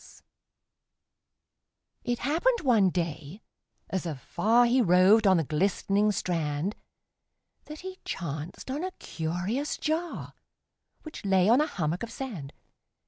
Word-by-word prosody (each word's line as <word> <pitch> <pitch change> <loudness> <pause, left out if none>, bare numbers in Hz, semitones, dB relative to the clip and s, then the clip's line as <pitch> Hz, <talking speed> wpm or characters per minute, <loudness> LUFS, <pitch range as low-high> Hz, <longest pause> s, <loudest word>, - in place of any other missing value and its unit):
It 240 0 -1
happened 340 - +1
one 225 -9 +4
day, 170 +1 -4 0.5
as 190 -2 -2
afar 215 - +2
He 250 +2 +3
roved 190 +2 +5
on 190 -2 +5
the 165 - +1
glistening 195 +6 +1
strand, 165 -1 -2 0.9
That 305 0 -9
he 375 0 -8
chanced 160 - -5
on 290 +5 -3
a 370 0 -4
curious 180 - -3
jar, 320 +2 -3 0.7
Which 310 - -9
lay 190 -2 +3
on 245 +5 +6
a 305 - +1
hummock 165 - -2
of 235 - -5
sand. 195 - -6
200 Hz, 120 wpm, -28 LUFS, 170-260 Hz, 0.9 s, on